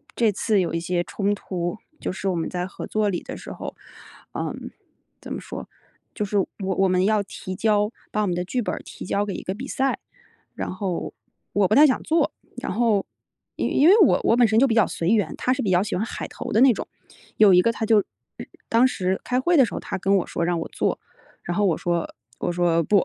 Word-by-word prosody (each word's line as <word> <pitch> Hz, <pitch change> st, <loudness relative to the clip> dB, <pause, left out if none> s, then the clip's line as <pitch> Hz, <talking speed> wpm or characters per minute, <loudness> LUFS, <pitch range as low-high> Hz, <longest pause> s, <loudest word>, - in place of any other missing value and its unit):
这 225 Hz, -3 st, +3 dB
次 205 Hz, +1 st, +1 dB
有 175 Hz, -, -2 dB
一 165 Hz, -, 0 dB
些 175 Hz, +1 st, -1 dB
冲 200 Hz, +6 st, -1 dB
突， 175 Hz, 0 st, -4 dB, 0.2 s
就 -, -, -3 dB
是 190 Hz, +1 st, -4 dB
我 185 Hz, -, 0 dB
们 165 Hz, -, -2 dB
在 180 Hz, 0 st, -3 dB
合 190 Hz, -, -7 dB
作 215 Hz, -1 st, +1 dB
里 175 Hz, -, -2 dB
的 -, -, -7 dB
时 -, -, -9 dB
候。 -, -, -7 dB, 0.6 s
嗯， -, -, -5 dB, 0.5 s
怎 -, -, -9 dB
么 -, -, -4 dB
说， -, -, -7 dB, 0.5 s
就 210 Hz, -, -1 dB
是 205 Hz, +1 st, -1 dB
我 190 Hz, -, 0 dB
我 190 Hz, 0 st, +1 dB
们 185 Hz, 0 st, +2 dB
要 215 Hz, 0 st, +3 dB
提 185 Hz, -1 st, -7 dB
交， 210 Hz, +1 st, +2 dB, 0.2 s
把 215 Hz, -, 0 dB
我 205 Hz, -, 0 dB
们 175 Hz, -, 0 dB
的 180 Hz, -, -1 dB
剧 245 Hz, +6 st, -1 dB
本 190 Hz, -5 st, -2 dB
儿 -, -, -5 dB
提 -, -, -9 dB
交 200 Hz, +2 st, 0 dB
给 200 Hz, -, -4 dB
一 -, -, -6 dB
个 190 Hz, -, -3 dB
比 255 Hz, +7 st, -7 dB
赛。 270 Hz, 0 st, 0 dB, 0.6 s
然 -, -, -4 dB
后 185 Hz, -2 st, -3 dB, 0.4 s
我 200 Hz, -2 st, +3 dB
不 215 Hz, -, +2 dB
太 300 Hz, +2 st, +8 dB
想 260 Hz, -, +1 dB
做， 320 Hz, -2 st, +2 dB, 0.3 s
然 250 Hz, -, -4 dB
后 220 Hz, -2 st, +2 dB, 0.5 s
因 -, -, -1 dB
因 290 Hz, -, +6 dB
为 410 Hz, -, +7 dB
我 350 Hz, -, +5 dB
我 230 Hz, -, +4 dB
本 240 Hz, -2 st, +6 dB
身 220 Hz, -, +2 dB
就 275 Hz, -, +5 dB
比 230 Hz, -, +1 dB
较 220 Hz, -, +4 dB
随 170 Hz, -, -2 dB
缘， 210 Hz, -2 st, +2 dB
他 255 Hz, -, +1 dB
是 260 Hz, -, -2 dB
比 205 Hz, -, -1 dB
较 180 Hz, +1 st, +4 dB
喜 210 Hz, -, -3 dB
欢 190 Hz, -, 0 dB
海 -, -, -5 dB
投 -, -, -7 dB
的 220 Hz, -, +4 dB
那 265 Hz, -2 st, +7 dB
种。 -, -, -6 dB, 0.5 s
有 210 Hz, -3 st, +7 dB
一 180 Hz, -, +7 dB
个 230 Hz, -, +2 dB
他 225 Hz, 0 st, -3 dB
就 215 Hz, -2 st, +4 dB, 0.7 s
当 235 Hz, +3 st, +5 dB
时 190 Hz, -6 st, -1 dB
开 250 Hz, 0 st, 0 dB
会 345 Hz, +6 st, +2 dB
的 270 Hz, -, +7 dB
时 220 Hz, -, -8 dB
候 -, -, -3 dB
他 -, -, -4 dB
跟 195 Hz, +2 st, +3 dB
我 185 Hz, -, -1 dB
说 -, -, -2 dB
让 175 Hz, -1 st, 0 dB
我 165 Hz, -, -4 dB
做， -, -, -1 dB, 0.4 s
然 175 Hz, -, -3 dB
后 205 Hz, -, +3 dB
我 175 Hz, -5 st, +2 dB
说， 170 Hz, -1 st, -2 dB, 0.3 s
我 -, -, -1 dB
说： 170 Hz, -1 st, +2 dB
“不。” 205 Hz, +6 st, +3 dB
200 Hz, 265 characters per minute, -24 LUFS, 180-225 Hz, 0.7 s, 太